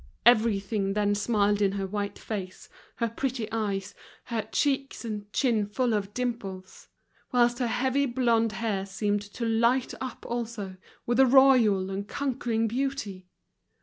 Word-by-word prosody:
Everything 210 -3 +3
then 205 0 +2
smiled 205 -1 +1
in 195 -1 +3
her 195 -1 -2
white 200 +1 -3
face, 190 -4 -6 0.3
her 235 - 0
pretty 235 0 -3
eyes, 205 -3 -2 0.3
her 230 -3 -4
cheeks 275 -3 0
and 210 -2 -5
chin 225 -5 +1
full 240 +3 0
of 205 -1 -1
dimples; 205 -6 -5 0.4
whilst 240 0 +3
her 245 - +1
heavy 260 +4 +1
blonde 235 -3 +2
hair 195 -2 -2
seemed 205 +1 -1
to 205 +3 -6
light 235 +3 +2
up 255 -3 -6
also, 225 -5 -4 0.3
with 240 +1 +1
a 265 - +7
royal 240 -8 +5
and 200 +1 -4
conquering 235 -4 -1
beauty. 235 -7 -3
225 Hz, 145 wpm, -27 LUFS, 205-245 Hz, 0.4 s, a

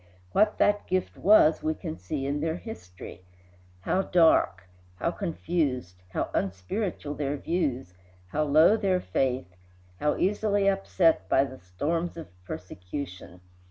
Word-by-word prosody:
What 210 +1 +3
that 205 0 +2
gift 185 0 -1
was 185 -6 +5
we 155 0 -1
can 80 - -6
see 90 +9 -4
in 140 +1 -1
their 160 +1 -1
history. 90 - -10 0.6
How 185 - +1
dark, 160 - +3 0.3
how 170 - -1
confused, 155 - -2
how - - -3
unspiritual 145 - -2
their 145 0 -2
views, 140 - -2 0.4
how 155 +6 0
low 155 +8 +6
their 195 -4 +1
faith, 125 - -1 0.4
how 150 0 +1
easily 205 0 +1
upset 180 - +2
by 135 - +4
the 130 -1 -7
storms 155 - -2
of 165 - -8 0.2
persecution! 90 0 -7
150 Hz, 130 wpm, -27 LUFS, -, 0.6 s, low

